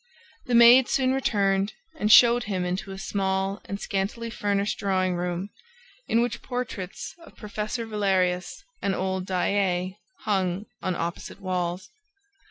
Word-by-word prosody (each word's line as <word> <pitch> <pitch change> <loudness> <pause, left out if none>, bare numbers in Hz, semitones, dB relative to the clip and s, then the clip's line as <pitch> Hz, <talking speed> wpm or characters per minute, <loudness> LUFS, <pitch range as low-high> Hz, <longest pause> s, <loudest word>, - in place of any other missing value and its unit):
The 245 - +1
maid 240 +2 +8
soon 260 -1 +2
returned 200 -6 +1 0.2
and 210 -8 +1
showed 240 +1 +7
him 185 -3 -2
into 185 +3 -3
a 190 - -6
small 195 0 -1
and 200 - -5
scantily 215 +4 -3
furnished 205 -2 -1
drawing 185 -2 +1
room, 180 +2 -3 0.6
in 230 +1 +3
which 240 - -3
portraits 245 -7 -5
of - - -16
Professor 215 +2 -4
Valerius 190 - 0 0.2
and 195 -1 0
old 190 0 -2
Daae 185 0 0 0.2
hung 190 -1 -1 0.2
on 185 -1 -1
opposite 170 +3 -5
walls. 185 -1 -3
195 Hz, 135 wpm, -26 LUFS, 185-215 Hz, 0.6 s, maid